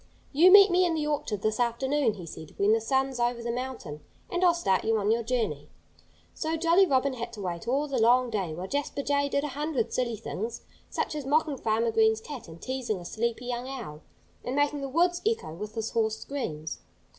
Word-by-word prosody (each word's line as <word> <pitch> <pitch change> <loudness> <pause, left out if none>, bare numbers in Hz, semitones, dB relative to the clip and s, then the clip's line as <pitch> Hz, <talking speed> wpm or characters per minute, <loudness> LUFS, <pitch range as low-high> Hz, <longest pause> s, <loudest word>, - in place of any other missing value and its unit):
"You 340 +6 +7
meet 400 -1 +9
me 360 +1 +4
in 345 -2 +1
the 305 -1 -1
orchard 285 -9 -2
this 215 +1 0
afternoon," 245 +1 +1
he 180 -4 -8
said, 160 -1 -10
"when 205 +2 +4
the 225 - +2
sun's 265 +2 0
over 240 0 0
the 235 - -2
mountain, 245 - -5 0.3
and 355 +1 0
I'll 350 -2 +5
start 195 - +1
you 225 0 +2
on 210 0 +1
your 230 +1 +2
journey." 220 - -2 0.6
So 320 0 -2
Jolly 340 +4 +4
Robin 270 -2 +2
had 235 -1 -5
to 210 - -7
wait 175 +3 -4
all 275 +4 +1
the 270 -3 -1
long 245 +2 +4
day, 195 -6 -1
while 180 +3 -5
Jasper 285 +3 -2
Jay 285 0 +1
did 280 0 0
a 295 - -2
hundred 280 -3 -2
silly 240 -3 0
things, 225 +3 -5 0.3
such - - -2
as 295 -3 -5
mocking 305 0 +2
Farmer 225 0 +1
Green's 220 0 +3
cat, 260 0 -8
and 165 0 -11
teasing 255 -3 -3
a 175 - -10
sleepy 235 +5 -2
young 245 0 -3
owl, 220 - -7 0.4
and 250 - -3
making 290 0 +1
the 275 - -4
woods 350 +5 +2
echo 440 - -1
with 210 +6 -7
his 225 -1 -3
hoarse 220 -1 0
screams. 160 - -5
245 Hz, 215 wpm, -28 LUFS, 220-285 Hz, 0.6 s, meet